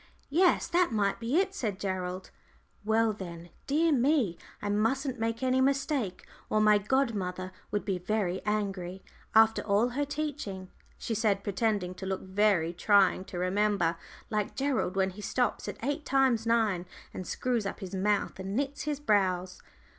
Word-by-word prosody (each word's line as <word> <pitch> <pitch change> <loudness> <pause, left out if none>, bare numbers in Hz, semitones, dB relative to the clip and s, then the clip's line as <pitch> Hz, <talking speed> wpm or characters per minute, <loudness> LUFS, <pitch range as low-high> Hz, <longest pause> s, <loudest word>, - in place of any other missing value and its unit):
"Yes 350 +3 +4
that 350 -3 +2
might 205 -3 +1
be 235 +6 0
it," 390 0 0
said 215 - -3
Gerald. 185 -1 -3 0.5
"Well, 220 +1 +2
then 175 -4 -8 0.2
dear 315 +4 +3
me, 260 - +2 0.2
I 205 - -4
mustn't 245 +5 0
make 230 +2 -2
any 260 0 +3
mistake, 270 - 0 0.2
or 215 - +2
my 210 -1 +5
godmother 200 -6 -1 0.2
would 205 - -2
be 190 -3 -1
very 190 -1 -1
angry, 195 -3 -2 0.3
after 220 0 +6
all 210 +4 +2
her 275 +4 -1
teaching," 280 -11 -4 0.3
she 230 - -3
said, 205 -2 +1
pretending 200 -2 0
to 190 +1 -7
look 190 0 -2
very 190 -3 +2
trying 190 0 +3
to 180 - -7
remember, 185 -1 +1 0.4
like 210 -1 -1
Gerald 265 -8 0
when 190 0 +1
he 205 +3 -10
stops 245 +1 -1
at 205 0 -5
"eight 285 +4 -1
times 260 -5 +2
nine," 215 -6 +2 0.3
and 185 - -6
screws 240 -5 -1
up - - -5
his 190 -1 -7
mouth 200 +1 0
and 190 +1 -4
knits 280 +2 -1
his 295 -2 -2
brows. 185 -8 +1
210 Hz, 160 wpm, -29 LUFS, 190-255 Hz, 0.5 s, after